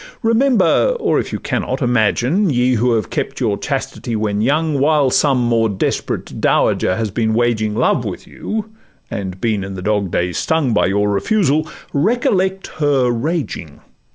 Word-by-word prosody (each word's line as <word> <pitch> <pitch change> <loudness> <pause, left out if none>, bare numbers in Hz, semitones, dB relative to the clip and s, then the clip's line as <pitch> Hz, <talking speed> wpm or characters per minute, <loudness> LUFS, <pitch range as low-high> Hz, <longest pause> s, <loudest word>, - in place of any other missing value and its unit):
Remember, 265 - +3
or - - +1
(if - - -4
you - - -2
can - - -2
not) - - -3
imagine, 125 - +1
Ye, 125 -2 +2
who 120 +1 +2
have 110 -5 -1
kept - - -3
your - - +1
chastity 115 - -4
when 105 -1 -1
young, 150 +4 +1
While 145 -2 +3
some 140 -1 +3
more 115 -2 +2
desperate 100 - -3
dowager 90 - +2
has 110 -1 -2
been 110 +1 0
waging 110 -3 +1
Love - - +2
with - - -6
you, 215 0 -5 0.4
and 95 -4 -5
been 110 -3 0
in 95 0 -6
the 90 - -7
dog 105 -1 0
days 90 +1 -1
stung 160 -7 +1
By 105 - +3
your 100 +2 +1
refusal, 155 - +1 0.2
recollect 190 +2 +1
her 140 -5 +2
raging! 120 - -3
120 Hz, 165 wpm, -18 LUFS, 105-155 Hz, 0.4 s, Remember